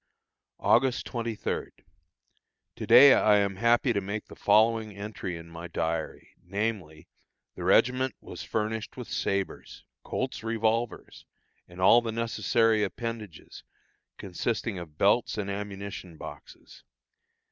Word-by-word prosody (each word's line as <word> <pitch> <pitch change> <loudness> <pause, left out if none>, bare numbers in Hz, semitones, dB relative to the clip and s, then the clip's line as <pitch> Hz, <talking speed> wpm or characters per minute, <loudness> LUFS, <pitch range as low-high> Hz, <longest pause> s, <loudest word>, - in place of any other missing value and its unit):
August 125 +1 +2
23. 115 -3 -3 1.1
To - - -6
day 140 -1 +9
I 105 -1 +4
am 100 -2 +1
happy 120 +3 +3
to 100 - 0
make 100 +2 -5
the - - -13
following 110 0 +2
entry 100 -3 -6
in 85 0 -11
my 85 +1 -8
diary, 80 -1 -4
namely: 95 -5 -4 0.5
the - - -8
regiment 130 +1 +3
was - - -9
furnished 110 0 -3
with - - -7
sabres, 100 -1 -3 0.2
Colt's - - -4
revolvers 115 +1 -2 0.4
and 90 +1 -14
all 105 +6 +6
the 115 -1 -3
necessary 115 -1 +1
appendages, 110 -4 -6 0.5
consisting 100 +2 -3
of 80 -3 -10
belts 105 +6 +2
and 100 -1 -3
ammunition 100 -4 -6
boxes. - - -12
105 Hz, 120 wpm, -28 LUFS, 95-115 Hz, 1.1 s, day